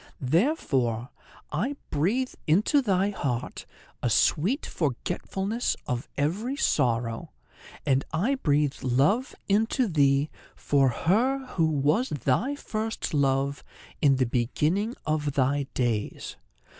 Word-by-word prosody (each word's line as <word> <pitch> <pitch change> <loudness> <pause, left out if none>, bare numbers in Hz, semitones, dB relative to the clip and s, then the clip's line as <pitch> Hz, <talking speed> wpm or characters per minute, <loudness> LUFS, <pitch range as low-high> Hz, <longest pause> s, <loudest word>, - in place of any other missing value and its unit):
Therefore 130 - 0 0.4
I 225 - -1 0.2
breathe 210 - 0
into 210 - +4
thy 200 -4 +1
heart 125 - -3 0.3
a 125 - +1
sweet 185 - +2
forgetfulness 190 - -2
of 125 +3 -3
every 195 - -1
sorrow, 120 - 0 0.5
and 135 -2 +2
I 190 +12 +1
breathe 150 - +1
love 140 - +1
into 225 +5 +2
thee 140 -3 +2 0.2
for 135 -2 +2
her 240 - +1
who 165 -3 +2
was 155 - +1
thy 145 - 0
first 220 -7 -4
love 140 0 +1 0.4
in 140 -2 +5
the 130 -1 +2
beginning 150 - 0
of 150 -2 -1
thy 140 +1 +1
days. 115 -5 -2
150 Hz, 110 wpm, -27 LUFS, 135-215 Hz, 0.5 s, in